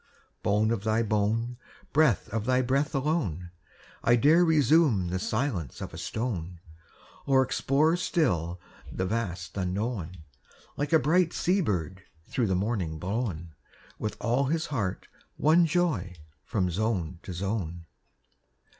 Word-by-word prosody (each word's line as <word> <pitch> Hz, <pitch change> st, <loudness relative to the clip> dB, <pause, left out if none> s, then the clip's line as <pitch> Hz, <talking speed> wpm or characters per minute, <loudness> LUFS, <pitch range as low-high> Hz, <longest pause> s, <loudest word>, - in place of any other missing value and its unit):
Bone 105 Hz, +2 st, +2 dB
of 110 Hz, -4 st, -1 dB
thy 110 Hz, +1 st, +2 dB
bone, 110 Hz, +3 st, 0 dB, 0.4 s
Breath 145 Hz, -10 st, +3 dB
of 110 Hz, 0 st, -2 dB
thy 130 Hz, 0 st, +3 dB
breath 140 Hz, +4 st, 0 dB
alone, 125 Hz, -, -1 dB, 0.5 s
I 120 Hz, -, +5 dB
dare 150 Hz, +8 st, +5 dB
resume 150 Hz, -, +4 dB
the 90 Hz, +1 st, -1 dB
silence 110 Hz, -, -2 dB
of -, -, -6 dB
a -, -, -7 dB
stone, 90 Hz, -7 st, -4 dB, 0.7 s
Or 135 Hz, -1 st, +5 dB
explore 145 Hz, +5 st, +2 dB
still 90 Hz, -, 0 dB, 0.3 s
the 95 Hz, -, -2 dB
vast 90 Hz, -5 st, -3 dB
unknown, 95 Hz, -2 st, -3 dB, 0.5 s
Like 145 Hz, 0 st, -2 dB
a 160 Hz, -, +7 dB
bright 165 Hz, +4 st, +2 dB
sea 190 Hz, +3 st, +1 dB
bird 95 Hz, -, -2 dB, 0.2 s
through 120 Hz, -4 st, -1 dB
the 95 Hz, -, +1 dB
morning 95 Hz, -5 st, -1 dB
blown, 90 Hz, -3 st, -3 dB, 0.5 s
With 110 Hz, -, -3 dB
all 125 Hz, +5 st, +1 dB
his 160 Hz, +4 st, 0 dB
heart 105 Hz, -10 st, -3 dB, 0.3 s
one 165 Hz, +3 st, +4 dB
joy, 150 Hz, -, 0 dB, 0.3 s
From 90 Hz, -4 st, 0 dB
zone 90 Hz, -4 st, -1 dB
to 95 Hz, -, -8 dB
zone. 90 Hz, -2 st, -3 dB
110 Hz, 135 wpm, -28 LUFS, 90-140 Hz, 0.7 s, a